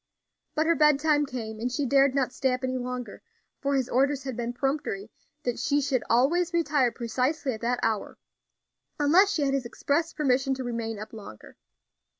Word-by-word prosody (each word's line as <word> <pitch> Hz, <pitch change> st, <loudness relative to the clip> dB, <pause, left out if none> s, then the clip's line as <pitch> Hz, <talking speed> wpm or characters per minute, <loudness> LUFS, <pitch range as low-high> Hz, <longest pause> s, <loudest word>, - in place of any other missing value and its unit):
But 310 Hz, -, +2 dB
her 335 Hz, -, +4 dB
bedtime 300 Hz, -1 st, +3 dB
came 220 Hz, -4 st, -6 dB
and 245 Hz, +2 st, -2 dB
she 275 Hz, +3 st, -1 dB
dared 275 Hz, 0 st, +4 dB
not 260 Hz, -2 st, 0 dB
stay 265 Hz, -1 st, +1 dB
up 255 Hz, -, -10 dB
any 255 Hz, 0 st, -1 dB
longer; 245 Hz, -3 st, -5 dB, 0.4 s
for 280 Hz, 0 st, 0 dB
his 260 Hz, -3 st, +1 dB
orders 275 Hz, +2 st, +1 dB
had 265 Hz, -3 st, -4 dB
been 240 Hz, 0 st, -3 dB
peremptory 245 Hz, -6 st, -2 dB, 0.3 s
that 245 Hz, -1 st, -2 dB
she 285 Hz, 0 st, +1 dB
should 265 Hz, -3 st, 0 dB
always 330 Hz, +9 st, +2 dB
retire 290 Hz, -7 st, +2 dB
precisely 260 Hz, +5 st, -1 dB
at 220 Hz, -, -8 dB
that 245 Hz, +1 st, 0 dB
hour, 220 Hz, -2 st, -1 dB, 0.8 s
unless 340 Hz, +8 st, +5 dB
she 305 Hz, -, 0 dB
had 275 Hz, -1 st, +1 dB
his 270 Hz, -3 st, -1 dB
express 320 Hz, +7 st, -1 dB
permission 270 Hz, -2 st, +1 dB
to 260 Hz, -, -5 dB
remain 230 Hz, -2 st, -3 dB
up 215 Hz, +2 st, -8 dB
longer. 200 Hz, -, -11 dB
265 Hz, 180 wpm, -27 LUFS, 240-290 Hz, 0.8 s, unless